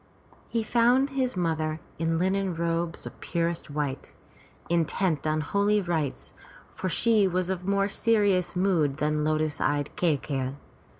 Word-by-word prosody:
He 230 -1 -1
found 245 +5 +3
his 260 -5 -1
mother 160 -2 -1 0.2
in 165 0 +1
linen 190 +1 0
robes 170 0 -2
of - - -9
purest 170 -2 -2
white, 145 -2 -3 0.5
intent 165 -1 0
on 155 0 +1
holy 200 +6 +2
rites, 165 -7 -2 0.4
for 185 - -3
she 215 +3 +3
was 185 0 -1
of 185 0 -4
more 200 0 +2
serious 205 -4 +2
mood 170 -7 +2
than 150 0 0
lotus 155 0 0
eyed 145 0 0
Kai 165 -5 +2
key'i. 135 -2 -3
170 Hz, 140 wpm, -27 LUFS, 155-195 Hz, 0.5 s, found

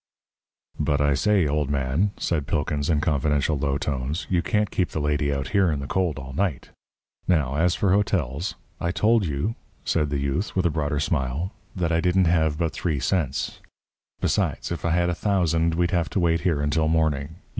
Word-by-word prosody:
"But, 75 0 +1
I 75 0 +3
say, 95 +6 +3
old 75 -1 0
man," 70 +7 +1
said 75 -5 -1
Pilkins, 75 0 -1
in 75 -3 +2
confidential 75 -1 +1
low 70 -1 0
tones, 70 +4 -2
"you 90 -2 +3
can't 105 +2 0
keep 90 - 0
the - - -3
lady 75 -1 0
out 70 -2 -2
here 95 -3 +3
in 75 - -1
the 70 - -5
cold 90 -1 0
all 65 -1 -7
night. 90 -3 -1 0.6
Now, 75 -7 +2
as 85 +3 +2
for 100 - +1
hotels 90 -7 0
" - - -30
"I 85 - 0
told 105 +2 +2
you," 75 +9 -1 0.3
said 75 -3 +1
the 70 - -1
youth, 70 +8 -2
with 95 -1 +1
a 85 - +3
broader 75 -1 -1
smile, 75 +4 -1 0.2
"that 85 -3 0
I 85 0 +2
didn't 90 +1 +3
have 80 -3 +2
but 85 -1 -1
three 80 -6 -1
cents. 70 +1 -1 0.6
Besides, - - 0
if 85 - -4
I - - +2
had 85 +1 +2
a - - 0
thousand, 85 -4 +1
we'd 85 0 +1
have 85 -1 +1
to - - -1
wait 85 -1 +2
here 85 -6 +1
until 75 +2 +1
morning. 80 -1 0
80 Hz, 200 wpm, -24 LUFS, 70-90 Hz, 0.6 s, I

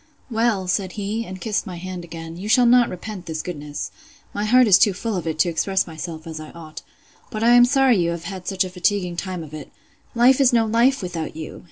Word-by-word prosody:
Well, 225 -4 +1
said 185 0 -1
he, 215 +2 -3
and 185 0 -8
kissed 210 0 -2
my 180 - -6
hand 180 0 -6
again, 165 -1 -8
you 195 +5 -6
shall 245 +2 +5
not 245 0 +5
repent 185 0 -8
this 160 -1 -4
goodness. 150 -4 -6 0.4
My 205 +1 -2
heart 250 +3 +5
is 200 -3 +6
too 205 - +4
full 215 +3 -3
of 175 -3 -4
it 160 -1 -2
to 165 +2 +3
express 190 +3 0
myself 160 -1 -7
as 160 -1 -7
I 155 - -9
ought. 160 -2 -10 0.5
But 220 -3 -4
I 235 - +5
am 245 0 +8
sorry 265 -2 +3
you 170 -1 +1
have 170 0 -4
had 185 +1 -7
such 195 -1 +1
a 185 - -5
fatiguing 180 0 0
time 180 -1 -4
of 155 -1 -12
it.—Life 240 - 0
is 265 -1 +5
no 230 -2 +3
life 235 +3 +2
without 165 -4 -5
you! 160 -1 -7
185 Hz, 230 wpm, -22 LUFS, 170-225 Hz, 0.5 s, am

